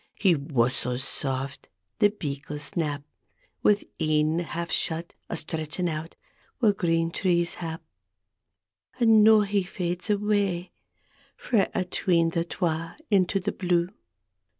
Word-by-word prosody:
He 190 -4 +4
whusslits 130 -3 0
saft; 135 0 -3 0.3
the 205 - +6
beagles 145 -6 -5
nap 150 -4 -1 0.6
Wi' 205 -1 +4 0.2
een 155 +1 +2
half 170 0 -4
shut, 165 +1 -1 0.2
a 170 - -2
stretchin' 160 +3 -3
out 160 0 -4 0.4
Whaur 220 -5 +4
green 165 -2 +1
trees 175 -1 +1
hap. 165 -1 -5 1.2
And 225 -3 +6
noo 220 0 +7
he 200 0 +1
fades 180 0 -3
awa' 205 -3 +1 0.7
Frae 215 -6 +2 0.2
'tween 175 -2 +1
the 165 0 0
twa 165 -1 -2
— - - -42
into 195 -1 +3
the 180 - -2
blue. 175 -2 +1
170 Hz, 125 wpm, -26 LUFS, 155-195 Hz, 1.2 s, noo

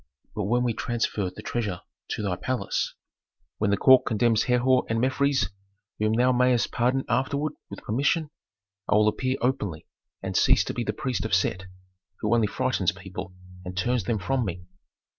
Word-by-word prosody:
But 105 - -2
when 120 +4 +2
we 120 -2 +1
transfer 110 -5 -1
the 90 - -11
treasure 105 -7 -3 0.3
to - - -3
thy 95 -3 0
palace, 130 +6 -2 0.6
when 105 - +1
the 100 - +2
court 130 +4 +7
condemns 115 0 +2
Herhor 125 +1 +3
and 115 0 +1
Mefres 130 -3 +1 0.5
whom 110 +1 +2
thou 125 +3 +3
mayst 125 -1 +2
pardon 125 +3 +1
afterward, 140 +4 0 0.2
with 100 - -9
permission, 145 +7 0 0.6
I - - +4
will 105 0 +5
appear 130 +4 -1
openly 105 - -1 0.4
and - - -4
cease - - +4
to - - -4
be 120 - -2
the 105 - -1
priest 125 +3 -2
of 110 -3 +1
Set, 95 0 0 0.5
who 105 +2 +1
only 115 -2 +3
frightens 115 -6 0
people 95 0 -8 0.3
and 90 0 -7
turns 120 +1 0
them 115 - 0
from 120 +7 0
me." 90 -3 -5
115 Hz, 175 wpm, -26 LUFS, 100-130 Hz, 0.6 s, court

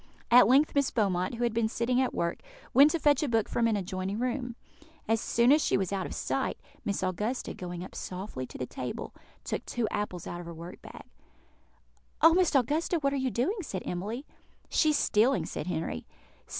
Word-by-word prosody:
At 245 +1 +8
length 275 +5 +4
Miss 280 -2 +2
Beaumont, 190 -2 0
who 240 - -2
had 235 -2 +1
been 230 -1 +2
sitting 245 +2 +1
at 260 - +1
work, 170 0 -2 0.3
went 280 +3 +8
to 335 - -1
fetch 290 -2 +4
a 300 - 0
book 225 -2 +2
from 235 -1 +1
an 220 -2 +1
adjoining 190 +1 -3
room. 245 0 -2 0.5
As 225 0 +2
soon 235 +2 +3
as 300 +1 +5
she - - +2
was 195 0 -1
out 190 -2 -1
of - - -7
sight, - - -1 0.3
Miss 200 -2 -2
Augusta, 210 +7 -2
going 180 0 -6
softly 185 -8 -5
up - - -18
to - - -9
the 125 - -3
table, 125 0 -6 0.3
took - - -3
two 240 -3 -1
apples 195 -4 -3
out 175 - -5
of 175 - -8
her 170 - -7
work 170 +2 -9
bag. - - -11 1.2
"Oh, 325 0 +7
Miss 360 -3 +3
Augusta, 300 +7 +2
what 280 -3 0
are - - 0
you 265 -1 0
doing?" 265 - 0
said 195 - -5
Emily. 210 +10 -4 0.4
"She 310 - +3
is 300 - +3
stealing," 240 +4 +3
said 155 - -5
Henry. 160 - -3
230 Hz, 205 wpm, -29 LUFS, 185-265 Hz, 1.2 s, At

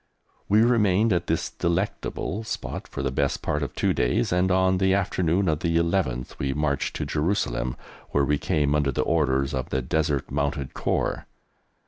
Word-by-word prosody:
We 105 +3 +5
remained 110 -3 +3
at 85 -1 -1
this 80 - -1
delectable 85 +4 -2
spot 110 - -5
for - - -5
the 65 - 0
best - - -1
part 75 - -1
of 70 -3 -4
two - - +1
days, - - +1
and 90 +1 +2
on 95 0 +3
the 95 0 +3
afternoon 95 -1 +1
of 75 -2 +1
the 85 -1 +1
11th 85 -8 -1
we 65 0 -1
marched 75 -2 -1
to - - -2
Jerusalem, 70 -7 -1 0.3
where 70 -1 +2
we 75 0 +1
came 75 -3 +1
under 75 -2 +2
the - - 0
orders 70 -3 +1
of 65 -2 -3
the 65 -1 -1
Desert 75 0 -1
Mounted 70 0 -2
Corps. - - -1
80 Hz, 175 wpm, -25 LUFS, 70-95 Hz, 0.3 s, We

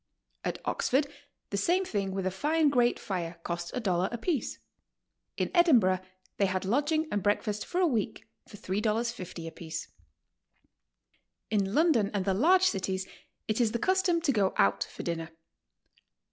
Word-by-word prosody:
At - - -2
Oxford 275 +3 +1 0.5
the 200 - -1
same 360 - +2
thing 200 - -2
with 190 0 -3
a 185 - +1
fine 300 - +2
grate 245 -3 +3
fire 175 -3 -4
cost 170 0 -3
a - - 0
dollar 185 -4 +1
apiece. 245 +3 -2 0.8
In - - -1
Edinburgh 245 - +5 0.4
they 200 - +3
had 185 0 -2
lodging 295 - +1
and 205 - 0
breakfast 205 +1 0
for 355 - -1
a 370 - +4
week 230 -7 -1 0.2
for 205 - -12
$3.50 210 -3 -2
apiece. 160 -1 -6 1.6
In 200 -1 +1
London 295 -11 +4
and 195 -2 0
the 195 - +2
large 350 - +4
cities 190 - 0 0.4
it 215 +3 +1
is 225 -2 +2
the - - +1
custom 375 +4 +2
to 315 -4 +2
go 200 -6 +1
out 100 0 +3
for - - -9
dinner. 165 -1 -3
210 Hz, 155 wpm, -29 LUFS, 185-285 Hz, 1.6 s, Edinburgh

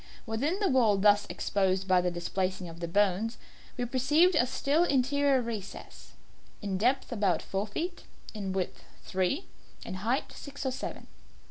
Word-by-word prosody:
Within 270 - -1
the 405 - +2
wall 235 - +4
thus 205 +1 +4
exposed 190 -1 0
by 185 -1 +5
the 180 - +1
displacing 185 +1 -2
of 165 0 -10
the 170 - -3
bones, 205 +5 +1 0.4
we 245 - -1
perceived 295 +9 +3
a 245 - +3
still 285 +5 +2
interior 275 -2 +2
recess, 220 -4 -7 0.5
in 195 -3 -2
depth 255 +6 +1
about 205 -6 +1
four 195 +2 -2
feet 345 - -4 0.3
in 200 -3 -4
width 190 -1 -3 0.2
three, 190 - -1 0.4
in - - -5
height 240 +6 0
six 280 -1 -8
or 265 - +1
seven. 255 - -6
220 Hz, 155 wpm, -30 LUFS, 190-270 Hz, 0.5 s, by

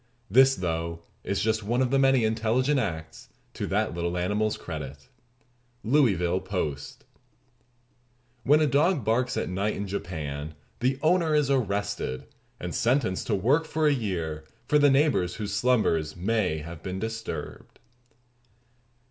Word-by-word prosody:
This, 135 +1 +6
though, 85 -2 -3 0.2
is 100 - -1
just 110 0 +1
one 115 +4 -1
of 130 -1 +1
the 135 - +3
many 135 -2 +4
intelligent 115 +6 +1
acts 80 -7 -5 0.2
to - - -4
that - - 0
little 85 +1 -2
animal's 105 +4 0
credit." 70 -4 -8 0.7
Louisville 100 - +2
Post. 75 -8 -4 1.4
When 145 +6 +4
a - - +4
dog 145 - +2
barks 125 +3 +1
at - - -1
night 100 +3 -1
in 100 - -3
Japan 80 -6 -5 0.2
the 130 +2 +1
owner 165 -1 +3
is 145 -2 +2
arrested, 100 - -1 0.4
and 90 -1 -5
sentenced 120 -6 0
to - - +1
work 135 - +2
for 160 0 -1
a 150 - +5
year 85 - -3 0.2
for 150 - +4
the 145 0 +6
neighbors 135 - +2
whose 105 -2 -4
slumbers 105 -9 +1
may 95 -3 0
have 80 +1 -8
been 95 0 -5
disturbed. 110 +2 -6
105 Hz, 140 wpm, -27 LUFS, 85-130 Hz, 1.4 s, This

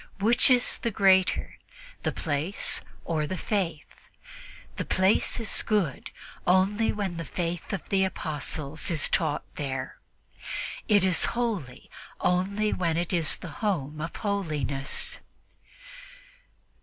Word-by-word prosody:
Which 225 +7 +4
is 250 -1 +3
the 235 - 0
greater, 190 -3 +3 0.4
the - - 0
place 155 +5 0 0.2
or 155 -3 0
the 185 - -3
Faith? 175 -8 -3 0.7
The - - -1
place 190 +5 +2
is 225 - +1
good 200 - 0 0.4
only 195 +5 +3
when 195 -5 -3
the 165 - -3
Faith 170 +1 -3
of 195 - -4
the 195 -1 +3
Apostles 155 -4 -2
is 160 -4 +2
taught 155 -4 0
there; 135 -2 -4 0.9
it 205 -3 +5
is 185 -2 +4
holy 205 - -2 0.3
only 200 +4 +1
when 170 -3 0
it 175 +2 -1
is 165 -4 +3
the 175 - -8
home 155 -8 -1
of 165 - -5
holiness." 150 - -1
180 Hz, 120 wpm, -27 LUFS, 155-200 Hz, 0.9 s, it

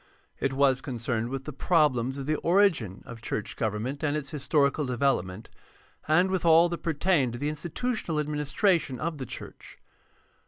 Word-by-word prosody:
It 135 - 0
was 135 -1 +3
concerned 120 -3 -3
with 135 0 -4
the 150 - -7
problems 135 -4 +2
of 135 - -5
the 155 +1 0
origin 170 - +2
of 120 -2 -10
church 110 - -4
government 115 +6 -2
and 150 -1 0
its 140 -3 -5
historical 145 0 +1
development, 120 -7 -1 0.6
and 175 +5 +3
with 190 -2 0
all 165 +1 +6
that 170 - -4
pertained 155 -5 +1
to - - -5
the 145 +4 -1
institutional 170 +3 -3
administration 150 - 0
of 160 -2 -3
the 130 - -5
church. - - -10
145 Hz, 160 wpm, -27 LUFS, 125-160 Hz, 0.6 s, all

